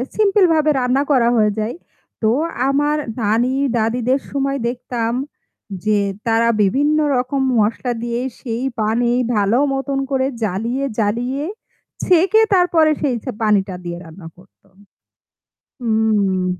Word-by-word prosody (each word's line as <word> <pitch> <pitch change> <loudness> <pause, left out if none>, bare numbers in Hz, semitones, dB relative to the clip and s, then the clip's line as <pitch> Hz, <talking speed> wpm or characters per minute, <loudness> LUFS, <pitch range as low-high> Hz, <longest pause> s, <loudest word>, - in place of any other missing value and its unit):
সিম্পলভাবে 370 -7 +3
রান্না 255 +2 +1
করা 245 -4 +4
হয়ে 210 -1 +3
যায়। 215 +3 -2 0.5
তো 220 - +2 0.4
আমার 290 +2 +1 0.2
নানী 225 +4 +1 0.2
দাদীদের 240 +4 +1
সময় 275 0 -1
দেখতাম 240 -2 -3 0.7
যে 215 -1 +3 0.3
তারা 230 +1 +3
বিভিন্ন 285 +10 +2 0.2
রকম 255 +2 -1 0.2
মশলা 230 +4 0
দিয়ে 235 0 -2 0.2
সেই 235 -1 -4 0.2
পানি 230 +3 +1 0.2
ভালো 205 +2 +2 0.2
মতন 270 0 -2
করে 265 -1 +1 0.2
জ্বালিয়ে, 225 +7 -2 0.2
জ্বালিয়ে 240 +6 -1 0.6
ছেঁকে 375 +5 +4
তারপরে 345 -4 +4
সেই 265 -5 0
ছে 255 - -4
পানিটা 205 -3 +1
দিয়ে 170 -1 -5
রান্না 165 +1 -11
করতো। 190 +2 -23 1.1
হুম। 215 -5 +1
240 Hz, 120 wpm, -19 LUFS, 215-275 Hz, 1.1 s, করা